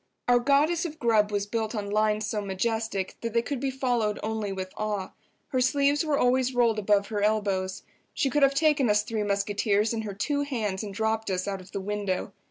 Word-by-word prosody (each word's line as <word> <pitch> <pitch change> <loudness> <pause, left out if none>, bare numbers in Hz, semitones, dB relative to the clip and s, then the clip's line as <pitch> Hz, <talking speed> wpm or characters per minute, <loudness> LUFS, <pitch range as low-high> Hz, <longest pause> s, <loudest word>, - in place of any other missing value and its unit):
Our 245 0 +5
Goddess 290 +6 +2
of 315 -3 -5
Grub 220 -5 +2
was 200 -1 0
built 220 +1 -2
on 200 -1 -3
lines 215 0 +1
so 210 0 -2
majestic 200 0 -2
that 230 -1 -3
they 235 0 +2
could 280 0 -3
be 270 +1 -1
followed 245 -5 0
only 215 -2 -2
with 185 -1 -5
awe. 210 -3 -2 0.4
Her 255 -2 0
sleeves 280 +3 +2
were 305 -3 +1
always 255 0 +2
rolled 230 -3 +3
above 200 -1 +2
her 210 -2 -2
elbows. 200 -3 0 0.3
She 270 - +1
could 295 - +1
have 275 0 +4
taken 295 -4 +3
us 210 0 +3
three 220 0 -3
musketeers 205 +1 +1
in 225 - -2
her 205 -3 -6
two 285 +8 -1
hands 220 -9 -2
and 210 -2 -5
dropped 220 +2 -1
us 185 0 -1
out 195 -2 -3
of 185 - -15
the - - -3
window. 200 -1 -2
215 Hz, 210 wpm, -27 LUFS, 205-250 Hz, 0.4 s, Our